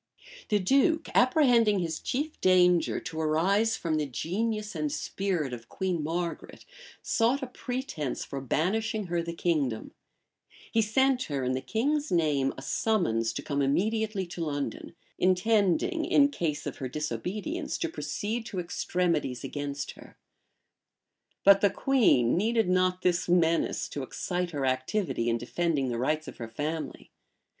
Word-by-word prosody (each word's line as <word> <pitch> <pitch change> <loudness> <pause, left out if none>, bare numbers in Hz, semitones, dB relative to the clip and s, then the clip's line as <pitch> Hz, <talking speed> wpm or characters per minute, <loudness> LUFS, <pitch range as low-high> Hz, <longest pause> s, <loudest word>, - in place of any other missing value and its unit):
The 210 - +3
duke, 280 - +2
apprehending 245 -5 +4
his 165 -3 -2
chief 295 +4 -3
danger 180 -2 +4
to 160 0 -5
arise 195 +9 +2
from 160 -2 -1
the 150 -1 -1
genius 210 - -2
and 300 - -2
spirit 190 - -2
of 115 -1 -8
Queen 185 -4 -2
Margaret 170 +2 -4 0.4
sought 250 +4 +1
a - - 0
pretence 245 - -4
for 140 - -5
banishing 205 - 0
her 170 - +2
the 170 0 -4
kingdom: 145 -11 -1 0.8
he 225 - +3
sent 255 +4 +2
her, 140 -3 -3
in 125 - 0
the 130 0 -1
king's 290 - -1
name, 150 -6 +2
a 135 - -8
summons 125 - +1
to - - -5
come 145 -2 -1
immediately 205 +7 0
to 175 -1 -5
London; 145 +2 -4 0.2
intending, 200 - +2
in 285 -1 +5
case 165 - -2
of - - -5
her 130 - -4
disobedience, 180 - -3
to 340 - -1
proceed 230 -8 -3
to 195 - -6
extremities 170 -7 -1
against 140 -1 -4
her. - - -15 1.3
But 200 0 +7
the 200 - +5
queen 195 - +3
needed 220 +3 +2
not 185 0 +1
this 175 -1 +1
menace 170 -2 +2
to 145 - -5
excite 180 +6 -3
her 145 -4 -2
activity 130 - 0
in 115 - +1
defending 140 +2 -1
the 120 -1 -2
rights 155 +5 0
of - - -9
her 115 - -6
family. 150 +5 -5
180 Hz, 150 wpm, -28 LUFS, 150-220 Hz, 1.3 s, But